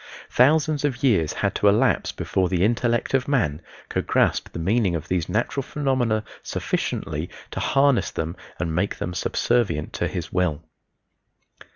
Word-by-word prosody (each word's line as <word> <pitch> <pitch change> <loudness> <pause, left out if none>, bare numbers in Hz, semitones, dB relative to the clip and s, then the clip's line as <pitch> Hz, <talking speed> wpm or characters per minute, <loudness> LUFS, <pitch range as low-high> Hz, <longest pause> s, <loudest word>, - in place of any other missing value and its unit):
Thousands 150 +3 +3
of 135 -3 -1
years 100 - +3
had - - -1
to 105 - +2
elapse 115 +6 +3
before 95 -2 -1
the 90 -1 +1
intellect 120 +2 0
of 130 -1 +2
man 85 - +1 0.3
could - - -2
grasp - - +2
the - - -7
meaning 95 +2 +1
of 80 - -4
these 90 -3 -1
natural 120 +5 0
phenomena 130 -6 0 0.2
sufficiently 75 +4 -3 0.2
to - - -4
harness 135 -2 +3
them 80 +2 -4 0.2
and 85 -3 -2
make 90 +5 0
them 90 - -4
subservient 115 -5 0
to - - -1
his 85 -2 -5
will. 90 -4 0
110 Hz, 155 wpm, -24 LUFS, 85-130 Hz, 0.3 s, Thousands